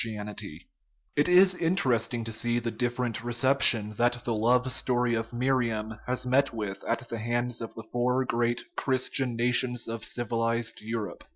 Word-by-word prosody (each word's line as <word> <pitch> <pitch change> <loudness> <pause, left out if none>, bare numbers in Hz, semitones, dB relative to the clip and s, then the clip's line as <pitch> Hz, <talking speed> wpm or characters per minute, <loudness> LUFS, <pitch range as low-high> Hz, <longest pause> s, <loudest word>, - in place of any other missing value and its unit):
And 105 -2 -5 0.9
it 145 +4 +3
is 185 +1 +6
interesting 130 - 0
to 115 - -5
see 120 +2 0
the 120 -1 -2
different 120 0 -2
reception 120 -3 +4
that 120 0 +1
the 120 - 0
love 125 +4 +2
story 125 -2 +1
of 115 0 -2
Miriam 120 -3 -1
has 125 0 -1
met 135 +2 +2
with 105 -4 -5
at 115 0 -2
the 115 - -5
hands 120 +1 -2
of 115 - -7
the 115 - -8
four 125 +3 0
great 120 0 0
Christian 130 -1 0
nations 120 0 +1
of 115 -1 -5
civilized 115 -1 -1
Europe. 110 -4 -5
120 Hz, 160 wpm, -28 LUFS, 115-125 Hz, 0.9 s, is